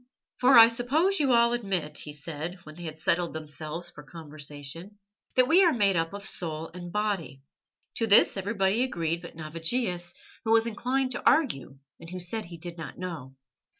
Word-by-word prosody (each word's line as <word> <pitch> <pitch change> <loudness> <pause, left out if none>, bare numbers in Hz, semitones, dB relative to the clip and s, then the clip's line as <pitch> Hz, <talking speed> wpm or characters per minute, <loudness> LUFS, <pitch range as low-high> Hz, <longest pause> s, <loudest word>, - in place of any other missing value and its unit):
"For 255 0 +6
I 225 0 +11
suppose 290 +12 +1
you 280 -3 +2
all 235 0 +4
admit," 190 -10 -2
he 150 - -6
said, 160 +4 -6
when 155 - -11
they 175 +2 -9
had 155 -1 -6
settled 170 +2 0
themselves 155 +2 -5
for 150 - -12
conversation, 150 +4 -6 0.4
"that 255 -1 +4
we 360 +7 +6
are 345 - +5
made 205 -7 +2
up 165 0 0
of 200 0 -6
soul 160 -4 -2
and 175 -1 -8
body." 195 -10 -2 0.5
To 225 - 0
this 205 - +6
everybody 195 +2 0
agreed 170 -9 -1
but 170 - -11
Navigius, 175 +4 -2 0.3
who 225 - -3
was 225 0 +4
inclined 255 +4 -1
to 245 - -3
argue, 135 - +2 0.2
and 165 - -11
who 185 +1 -6
said 205 +5 -2
he 170 -1 -10
did 170 +1 -8
not 150 -5 -8
know. 160 -8 -7
175 Hz, 185 wpm, -27 LUFS, 160-230 Hz, 0.5 s, I